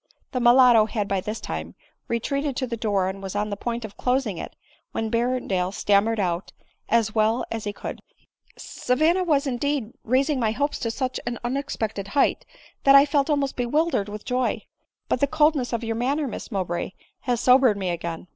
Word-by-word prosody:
The 255 - -1
mulatto 240 -2 +6
had 210 -3 -2
by 195 -2 0
this 210 +3 -4
time 80 +2 -6 0.3
retreated 275 +4 -1
to 260 - -1
the 240 -2 -4
door, 205 -4 0
and 190 +1 -5
was 195 0 -6
on 210 0 -1
the - - -1
point 235 +2 -4
of 205 -2 -11
closing 250 -7 0
it, - - -7 0.4
when 225 -1 -2
Berrendale 230 -6 0
stam 200 0 +3
mered 225 0 -1
out, 180 -2 -1 0.4
as 225 -2 +2
well 220 +2 +2
as 225 -1 -4
he 205 - -1
could, - - -7 0.4
'* - - -33 0.2
Savanna 315 +9 +2
was, 300 -5 +2
indeed, 270 -2 -1
raising 265 +4 +1
my 220 -2 +1
hopes 285 +5 -1
to 230 - -2
such 255 +2 -2
an 240 0 -2
unexpected 240 -6 -3
height, - - +2 0.4
that 275 0 +7
I 275 +1 +8
felt 285 0 +1
almost 285 -2 0
bewildered 245 -3 0
with 210 0 -8
joy; 250 0 -1 0.4
but - - 0
the 280 - +3
coldness 300 -3 +2
of 235 0 -2
your 225 0 -2
manner, 275 +5 0
Miss 245 - -7
Mowbray, 185 -2 -2 0.3
has 245 -2 -1
sobered 250 -3 +5
me 190 -2 -2
again." 170 -1 -4
235 Hz, 195 wpm, -24 LUFS, 205-270 Hz, 0.4 s, I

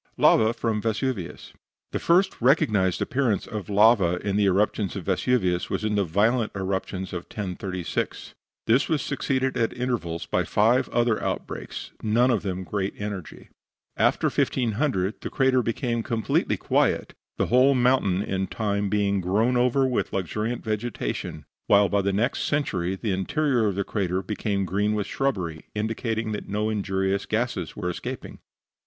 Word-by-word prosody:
LAVA 110 0 +5
FROM 110 -3 -1
VESUVIUS 115 -4 -3 0.4
The - - -2
first 185 +3 +3
recognised 110 - +3
appearance 120 -7 0
of 105 -4 -6
lava 100 -4 +5
in 100 - 0
the 105 0 +3
eruptions 100 +1 +1
of 95 -4 -5
Vesuvius 95 -3 +1
was - - -2
in 110 0 0
the 100 -1 +2
violent 110 +7 +1
eruption 95 -1 -2
of 90 -2 -6
1036. 95 -3 -4 0.3
This 120 +5 +3
was 155 -4 +1
succeeded 130 -1 -1
at 115 +1 0
intervals 115 -10 -2
by - - 0
five 115 +5 +2
other 120 -2 +1
outbreaks, - - -4
none 120 +4 +3
of 115 - +1
them 95 -2 -3
of - - -8
great 100 +1 -2
energy. 100 -4 -6 0.5
After - - +2
1500 115 -4 0
the - - -4
crater 130 -2 +3
became 115 0 -1
completely 115 0 0
quiet, - - +1 0.2
the - - +1
whole 130 +2 +6
mountain 120 -7 +2
in 95 -1 -2
time 100 -2 -1
being 100 -1 +1
grown 105 +8 +1
over 125 +2 +3
with 125 -2 -1
luxuriant 105 +5 -2
vegetation, 110 -7 -3 0.2
while 100 0 +5
by 100 +2 +2
the 100 +1 0
next 110 +7 0
century 95 -11 0
the 105 +2 -3
interior 120 - +1
of 100 - -1
the 100 - 0
crater 95 -2 -1
became 100 0 -2
green 105 +4 0
with 105 -2 -1
shrubbery, 90 - -2
indicating 110 +1 -2
that 105 - -5
no 105 +2 0
injurious 95 -1 -1
gases 110 -6 -2
were 90 - -4
escaping. - - -7
105 Hz, 155 wpm, -25 LUFS, 95-120 Hz, 0.5 s, whole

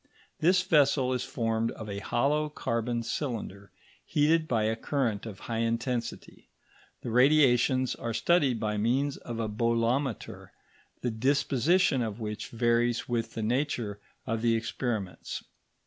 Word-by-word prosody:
This 180 +3 +4
vessel 140 -7 +3
is 125 -1 -1
formed 115 -1 -1
of 110 - -8
a 100 -1 -4
hollow 150 +8 +1
carbon 115 -4 -2
cylinder, 110 -7 -4 0.3
heated 155 +2 +2
by 115 -5 +1
a 110 +1 +1
current 115 -4 -1
of 100 -3 -9
high 115 -1 -3
intensity; 115 +1 -3 0.5
the 120 - -4
radiations 130 -1 +4
are 115 - -4
studied 130 0 +2
by 105 -1 -1
means 130 +6 +1
of 115 -1 -7
a 115 - -1
bolometer, 115 +3 -1 0.5
the 120 - 0
disposition 140 +5 +2
of 110 -1 -3
which 105 -1 -4
varies 120 0 +1
with 115 -2 -2
the 110 - -2
nature 120 -4 -1 0.3
of 115 -3 -2
the 115 -1 +3
experiments. 110 -3 -3
120 Hz, 135 wpm, -29 LUFS, 115-135 Hz, 0.5 s, This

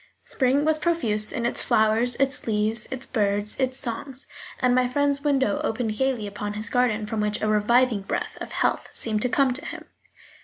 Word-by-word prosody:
Spring 270 +2 +1
was 315 0 +2
profuse 230 -12 +1
in 235 - -3
its 240 - -1
flowers, 220 +3 +2
its 275 -1 0
leaves, 215 +1 0
its 265 0 -4
birds, 205 -2 0
its 260 -1 0
songs; 270 +1 -3 0.3
and 250 -1 +3
my 250 0 +3
friend's 280 +2 +1
window 270 -8 +1
opened 220 -1 -1
gaily 260 -3 0
upon 205 0 -5
his 210 +1 -2
garden, 240 -4 +1
from 215 0 -2
which 210 0 0
a 215 - -1
reviving 215 +1 +3
breath 195 - -4
of - - -6
health - - 0
seemed 215 -2 -1
to 250 - +1
come 265 0 +2
to 270 - -6
him. - - -7
240 Hz, 190 wpm, -24 LUFS, 215-265 Hz, 0.3 s, and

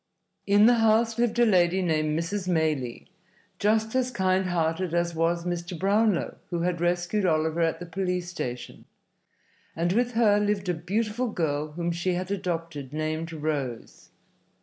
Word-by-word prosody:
In 205 +1 +6
the 240 0 +5
house 225 +1 +3
lived 240 -1 +1
a 240 - +5
lady 185 -3 +3
named 155 -2 0
Mrs. 185 +3 -3
Maylie, 155 -8 -1 0.5
just 220 +1 +1
as 255 -1 +1
kind 190 -5 +1
hearted 170 0 -1
as 170 0 0
was 170 +1 0
Mr. 175 0 -3
Brownlow 200 +1 +1
who 175 -2 -2
had 175 -1 -1
rescued 175 +4 0
Oliver 160 -1 +1
at 165 0 +1
the 175 - -6
police 180 0 -2
station, 125 -8 -6 0.9
and 170 +2 0
with 245 +3 +1
her 215 -3 +4
lived 205 -2 0
a - - +2
beautiful 210 +8 -1
girl 150 -5 -2
whom 170 +1 -2
she 175 +2 -1
had 185 +2 -4
adopted, 165 -7 -4
named 155 +2 -3
Rose. 150 -7 -4
175 Hz, 155 wpm, -26 LUFS, 165-205 Hz, 0.9 s, In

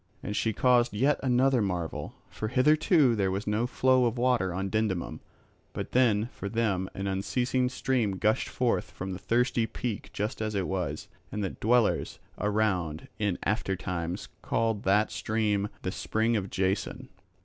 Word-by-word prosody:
And 105 - -3
she 110 - +1
caused 120 0 +3
yet 135 +6 +2
another 130 -1 +3
marvel; 90 -5 -3
for 110 - -5
hitherto 145 - +4
there 100 -3 +1
was 95 +2 -2
no 105 +3 0
flow 130 0 +3
of 120 +1 0
water 120 -6 +2
on 95 +2 -2
Dindymum, 105 -5 -1 0.5
but - - -5
then 115 -4 +3
for 100 - -5
them 100 -5 0
an 95 - -3
unceasing 125 +6 0
stream 125 -6 0
gushed 110 +3 +1
forth - - 0
from 95 +1 -6
the 90 - -5
thirsty 115 +4 +1
peak 115 -3 -4
just 105 +3 -3
as 110 -1 -2
it 95 -2 0
was, 95 -2 -3 0.2
and 105 - -2
the 95 - -1
dwellers 120 0 +1 0.2
around 100 -7 0
in 100 -4 0
after 95 -2 0
times 85 -2 -4
called 115 -2 0
that 105 +3 +3
stream, 105 -2 0
the 95 - -1
spring 110 +4 0
of 100 -3 -1
Jason. 95 +1 -1
110 Hz, 160 wpm, -28 LUFS, 95-120 Hz, 0.5 s, hitherto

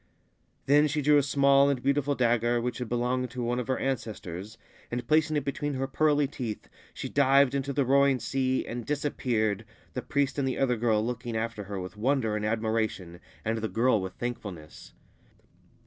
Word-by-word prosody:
Then 145 +2 +5
she 150 +1 -1
drew 150 +1 +5
a - - +3
small 140 0 +4
and 135 -3 -1
beautiful 140 +1 +1
dagger, 120 -1 +2
which 125 +1 -3
had 125 -3 -4
belonged 125 +1 0
to 125 +1 -5
one 120 +1 0
of 125 - -4
her 130 - 0
ancestors, 110 -5 -4 0.3
and, 120 0 -4
placing 155 0 +3
it 145 - -2
between 145 +1 -2
her 130 +1 -1
pearly 145 +1 +2
teeth, 120 -6 -6 0.2
she - - -6
dived 135 0 +4
into 140 0 -1
the 140 0 +1
roaring 140 0 +4
sea 130 0 0
and 120 +1 -5
disappeared, 115 -7 -1 0.3
the - - -3
priest 140 0 -1
and 135 - 0
the 130 - -2
other 130 -2 +2
girl 110 -2 +1
looking 120 -1 -3
after 110 -2 -3
her 100 0 -5
with 90 +2 -7
wonder 115 -2 +1
and 105 0 -2
admiration, 110 -5 -2 0.3
arid 110 0 -1
the 110 - -2
girl 115 -2 +2
with 95 0 -5
thankfulness. 100 -10 -7
125 Hz, 185 wpm, -28 LUFS, 110-140 Hz, 0.3 s, Then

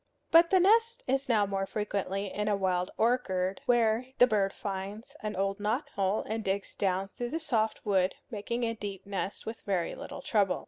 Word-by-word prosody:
But 335 +1 +7
the 380 - +5
nest 455 +6 +4
is 270 0 0
now 215 -3 +4
more 195 -1 -2
frequently 200 -2 -2
in 210 0 -1
a 210 - +3
wild 185 -2 0
orchard, 195 -6 +1
where 235 0 +3
the 245 - +8
bird 205 -5 +1
finds 200 +8 -6
an 215 -1 -3
old 195 +2 -1
knot 235 +8 -1
hole 195 -3 0
and 220 +1 -2
digs 195 0 -2
down 190 0 0
through 240 +3 -5
the 325 - -2
soft 225 -9 -1
wood, 190 -2 +2 0.2
making 235 +3 -3
a 230 -1 0
deep 200 -3 -6
nest 200 0 -4
with 225 +1 -6
very 190 -5 -1
little - - -8
trouble. 200 -4 +2
210 Hz, 190 wpm, -30 LUFS, 195-240 Hz, 0.2 s, the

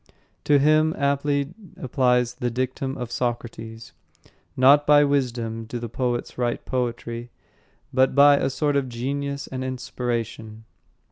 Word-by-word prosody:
To 145 - +5
him 155 +2 +3
aptly 140 +1 0 0.2
applies 125 -2 +1
the 125 -1 -2
dictum 130 +2 -3
of 125 -1 -6
Socrates: 115 -2 -4 0.6
"Not 140 +3 +6
by 145 0 +7
wisdom 120 -5 -1
do 115 +2 -5
the 120 -1 -5
poets 120 +1 -3
write 120 -1 -1
poetry, 120 -1 -3 0.6
but 130 0 +3
by 145 0 +7
a 135 - 0
sort 145 +2 0
of 135 -2 0
genius 140 +3 -3
and 130 -1 -5
inspiration." 115 -3 -4
130 Hz, 130 wpm, -24 LUFS, 120-140 Hz, 0.6 s, by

